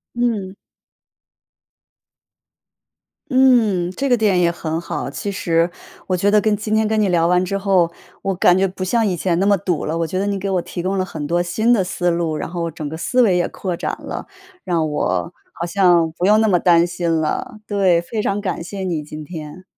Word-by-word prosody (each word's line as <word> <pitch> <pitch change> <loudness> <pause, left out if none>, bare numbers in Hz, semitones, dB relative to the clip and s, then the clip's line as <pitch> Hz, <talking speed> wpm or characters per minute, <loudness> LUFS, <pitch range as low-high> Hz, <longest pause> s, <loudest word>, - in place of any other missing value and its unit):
嗯。 220 -6 -1 2.8
嗯， 235 -9 +3
这 275 +8 -2
个 245 - +4
点 205 -5 +2
也 170 -1 +3
很 165 -1 -3
好， 170 - -4
其 200 +7 -4
实 170 -3 +1 0.4
我 185 - 0
觉 200 +3 +2
得 210 0 +5
跟 210 0 +1
今 215 +1 -2
天 220 0 +2
跟 220 0 0
你 210 -2 +2
聊 170 -2 +3
完 180 +1 +3
之 195 +2 -2
后， 190 -4 +2 0.3
我 195 -1 -1
感 180 0 +4
觉 195 - +3
不 185 0 -7
像 225 +4 +1
以 190 - 0
前 170 -1 0
那 190 - +2
么 200 0 +4
堵 175 -4 -2
了。 160 - -2
我 165 - 0
觉 185 +3 -3
得 195 - 0
你 200 -1 -1
给 195 +1 -3
我 185 -3 0
提 175 - -6
供 190 +2 -1
了 185 - 0
很 150 -5 -6
多 175 +3 +1
新 215 +7 0
的 220 -6 +4
思 180 0 -1
路， 170 -2 0
然 - - -4
后 170 -1 -3
整 155 -2 -6
个 160 - -6
思 250 +9 0
维 200 -7 +4
也 175 - +1
扩 180 -3 -4
展 - - -3
了， - - -6 0.4
让 165 -3 0
我 150 +2 -1 0.2
好 170 - -4
像 175 -3 +3
不 175 +2 -4
用 210 +2 +5
那 220 - +3
么 180 -3 +4
担 170 0 +4
心 175 -1 -2
了， 215 +9 -3
对， 190 -4 +2
非 210 +5 -4
常 205 -1 -1
感 185 -4 -3
谢 200 +3 -7
你 170 -5 -2
今 150 +1 -8
天。 155 +2 -8
185 Hz, 235 characters per minute, -20 LUFS, 170-205 Hz, 2.8 s, 得